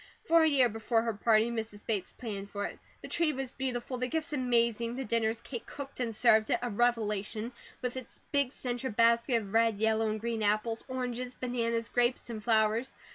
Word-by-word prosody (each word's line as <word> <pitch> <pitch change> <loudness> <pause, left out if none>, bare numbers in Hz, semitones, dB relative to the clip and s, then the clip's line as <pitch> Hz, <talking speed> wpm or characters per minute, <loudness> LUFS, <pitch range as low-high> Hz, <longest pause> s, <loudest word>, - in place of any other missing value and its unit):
For 335 -7 +5
a 320 - +5
year 275 -5 +5
before 225 +1 0
her 230 -1 -1
party 220 +2 +3
Mrs. 220 -3 -5
Bates 210 -5 -1
planned 205 -5 -6
for 205 0 -3
it. - - -7 0.2
The - - -5
tree 330 -3 +1
was 265 -1 -4
beautiful, 255 -1 -3
the 250 - 0
gifts 310 +2 -2
amazing, 235 -3 +1
the 265 0 -3
dinner, 225 0 +1
as 225 +1 -4
Kate 235 -2 -6
cooked 280 -2 -8
and 230 -3 -2
served 220 -1 +4
it, - - +3
a 245 - -2
revelation, 215 0 0 0.3
with 250 0 -2
its 255 -2 -8
big 280 -3 +2
centre 250 -1 -3
basket 230 +1 +3
of 200 0 -10
red, 225 -2 +3
yellow, 220 +1 +2
and 215 0 -2
green 230 0 -2
apples, 215 +2 +1
oranges, 250 -1 -3
bananas, 235 -2 -1
grapes, 245 0 +1
and 215 -2 -6
flowers. 220 +2 +2
235 Hz, 200 wpm, -31 LUFS, 220-250 Hz, 0.3 s, For